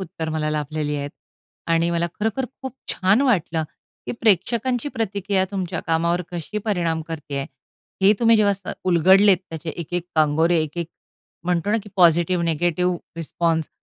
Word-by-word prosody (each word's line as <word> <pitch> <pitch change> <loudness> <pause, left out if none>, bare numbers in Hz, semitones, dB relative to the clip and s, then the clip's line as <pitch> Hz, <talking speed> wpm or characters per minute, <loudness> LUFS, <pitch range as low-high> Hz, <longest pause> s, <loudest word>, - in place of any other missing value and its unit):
उत्तर 160 -3 -5
मला 155 -1 -1
लाभलेली 150 0 -2
आहेत. 140 0 -4 0.6
आणि 165 +1 +2
मला 170 0 0
खरोखर 225 +5 0 0.2
खूप 265 -1 -6 0.2
छान 190 +6 +3
वाटलं, 175 - +1 0.4
की - - -2
प्रेक्षकांची 235 - +2
प्रतिक्रिया 200 -3 0
तुमच्या 190 -4 -3
कामावर 170 +2 +1
कशी 175 +5 -4
परिणाम 170 -6 0
करते 150 -3 -6
आहे. 135 - -2 0.6
हे 200 +2 +7
तुम्ही 230 -1 +5
जेव्हा 205 -1 +4
स 195 -1 -7
उलगडलेत 190 +3 +5
त्याचे 160 0 -5
एक-एक 175 +1 -3
कांगोरे, 160 +2 +3
एक-एक 160 +2 -4 0.6
म्हणतो 180 +2 0
ना, 220 - +3
की 210 - -12
पॉझिटिव्ह, 175 0 +4
नेगेटिव्ह 175 +2 +1 0.2
रिस्पॉन्स 165 -1 -1
175 Hz, 150 wpm, -22 LUFS, 160-200 Hz, 0.6 s, हे